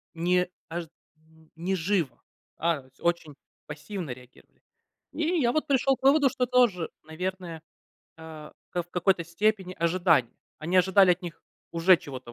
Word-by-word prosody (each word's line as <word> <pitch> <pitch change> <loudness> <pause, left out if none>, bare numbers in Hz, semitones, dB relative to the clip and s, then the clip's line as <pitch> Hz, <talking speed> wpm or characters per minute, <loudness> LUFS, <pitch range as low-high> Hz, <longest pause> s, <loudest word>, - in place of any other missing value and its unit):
Не 180 +2 +2 0.2
аж 170 +1 -4 0.3
м, 160 0 -25
не 180 +4 -2
живо, 175 -4 -1 0.3
а 165 -3 0
с 130 0 -25
очень 170 -4 -1 0.3
пассивно 155 +2 -6
реагировали. 125 0 -16 0.5
И - - -3 0.2
я, 240 -2 +2
вот, 310 - 0
пришёл 270 0 +3
к - - -39
выводу, 280 0 +6
что 250 0 -1
тоже, 240 -9 +2 0.2
наверное, 175 +1 -5 0.6
а 160 -2 -10 0.2
ка 175 - -1
в 175 - -25
какой-то 180 -1 +1
степени 190 +2 -1
ожидание. 170 -7 +2 0.2
Они 175 +4 +1
ожидали 190 +1 +5
от 180 - -5
них 170 -2 -8 0.3
уже 170 +2 +5
чего-то 130 -6 -9
175 Hz, 150 wpm, -27 LUFS, 160-190 Hz, 0.6 s, выводу